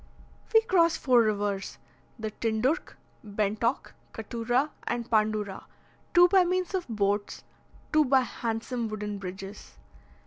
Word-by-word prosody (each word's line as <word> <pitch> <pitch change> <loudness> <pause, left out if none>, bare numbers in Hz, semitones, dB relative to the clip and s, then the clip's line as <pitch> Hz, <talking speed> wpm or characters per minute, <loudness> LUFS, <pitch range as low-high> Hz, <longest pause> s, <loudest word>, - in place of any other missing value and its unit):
We 445 - +6
crossed 340 -7 +3
four 250 -3 +4
rivers, 205 -3 -1 0.4
the 220 -2 -4
Tindurch, 230 - -1 0.3
Bentock, 215 +3 -1 0.2
Cattura, 240 +6 -1 0.2
and 235 -1 -2
Pandura, 215 -3 0 0.5
two 350 0 +8
by 380 0 +5
means 365 +1 -1
of 370 -2 -2
boats, 205 -2 -1 0.5
two 305 0 +5
by 265 0 +4
handsome 230 0 -3
wooden 210 -1 -5
bridges. 195 +2 -8
225 Hz, 115 wpm, -28 LUFS, 210-275 Hz, 0.5 s, two